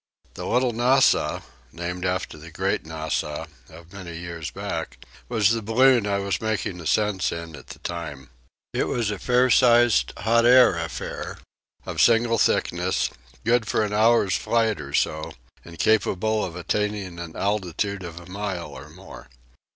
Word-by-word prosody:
The - - -6
"Little 125 0 +2
Nassau" 125 +4 +3 0.3
(named 90 +1 -5
after 90 -2 -2
the 80 +2 -11
"Great 95 0 -2
Nassau" 80 -1 -3 0.2
of 85 +2 -15
many 90 -4 -8
years 85 -2 -6
back) - - -5 0.3
was 110 -3 +3
the 115 0 0
balloon 120 +1 +4
I 100 -1 +1
was 100 -2 -2
making 105 -5 -2
ascents 95 +4 +1
in 85 -1 -6
at - - -13
the - - -10
time. 75 -7 -7 0.4
It - - 0
was 115 -4 -1
a 100 - -5
fair 125 +3 +3
sized, 120 - +5
hot 115 +1 +2
air 125 -4 +7
affair, 80 -1 -5 0.5
of - - -1
single 115 0 +4
thickness, - - +1 0.3
good 115 -1 +2
for 110 - +1
an 105 -1 -3
hour's 110 -3 +3
flight 115 -6 0
or 70 -1 -5
so 80 0 -1 0.3
and 85 -1 -12
capable 110 +1 +1
of 85 - -5
attaining 100 -1 -2
an 85 -2 -8
altitude 100 0 -2
of 85 -1 -8
a 85 - -13
mile 95 -2 -5
or - - -11
more. - - -13
100 Hz, 160 wpm, -24 LUFS, 85-115 Hz, 0.5 s, air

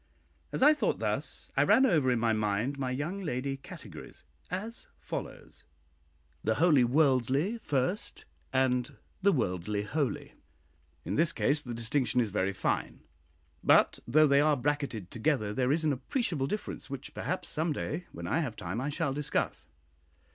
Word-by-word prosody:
As - - 0
I 300 +2 +8
thought 305 - 0
thus, - - -3
I - - +4
ran 265 - +5
over 155 - +3
in 125 - +3
my 115 0 +2
mind 110 +6 -1
my 130 -2 -1
young 150 +10 -3
lady 135 -4 -2
categories, 135 - -11 0.3
as 210 +6 -4
follows: - - -7 0.8
{The 110 +1 +1
wholly 150 -5 +5
worldly 135 - +2
First, 145 - -2
{ - - -38
and 125 -1 -2 0.2
{The 200 +1 +5
worldly 100 - -1
holy. 140 +5 -2 0.7
In 95 +6 -2
this 165 0 +4
case 145 -1 +1
the 120 -4 -6
distinction 125 +1 +1
is 115 -4 +1
very 95 -1 0
fine; 95 - -2 0.6
but - - +5
though 155 +6 +5
they 140 -1 +5
are 150 -1 +3
bracketed 130 -8 -2
together, 110 -4 0
there 125 +3 +1
is 160 +2 +1
an 150 - +3
appreciable 145 - -1
difference, 210 -2 -4
which 140 0 -6
perhaps, 185 0 -3
some 160 +1 +1
day 155 +4 -3
when - - -7
I 160 - +1
have 130 -9 -2
time, 95 +6 -4
I 140 - -2
shall 145 -2 -1
discuss. 145 +1 -2
140 Hz, 160 wpm, -30 LUFS, 120-155 Hz, 0.8 s, I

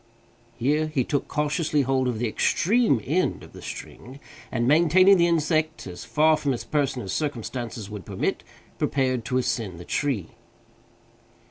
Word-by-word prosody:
Here 150 +6 +1
he 150 -4 0
took 140 +3 -2
cautiously 150 0 0
hold 130 0 +1
of 120 -3 -1
the 120 +2 -1
extreme 195 - +2
end 175 +8 0
of - - -14
the - - -11
string, 130 +3 -9 0.3
and, 120 +1 0
maintaining 175 +6 +6
the 170 0 +4
insect 155 -1 0
as 90 -1 -8
far 155 +1 +3
from 145 -3 0
his 120 - -4
person 135 -5 -1
as 95 - -4
circumstances 120 -6 -4
would 105 -2 -7
permit, - - -2 0.4
prepared 130 -3 0
to 125 - 0
ascend 110 -8 -2
the 85 - -9
tree. 130 - -1
140 Hz, 155 wpm, -25 LUFS, 120-155 Hz, 0.4 s, maintaining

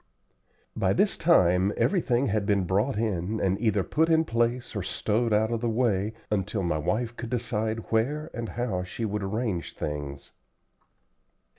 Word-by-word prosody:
By - - +2
this - - +2
time 90 +3 +4
everything 140 -9 +2
had 105 -4 0
been 100 -3 +2
brought 100 +8 0
in 105 -1 -1
and 95 +1 0
either 105 -4 +2
put 160 - +1
in 160 0 +4
place 120 -1 -1
or 100 - -1
stowed 110 +5 0
out 110 +2 +2
of 115 -1 -1
the 120 - 0
way, 110 -3 +1 0.2
until 100 0 -1
my 85 -3 0
wife 115 +9 -1
could 120 -1 -6
decide 110 -2 -2
where 145 +8 0
and 115 -2 -4
how 110 -3 -2
she 90 +5 -4
would 105 0 -2
arrange 100 -2 -2
things. 70 -2 -5
110 Hz, 160 wpm, -27 LUFS, 95-120 Hz, 0.2 s, time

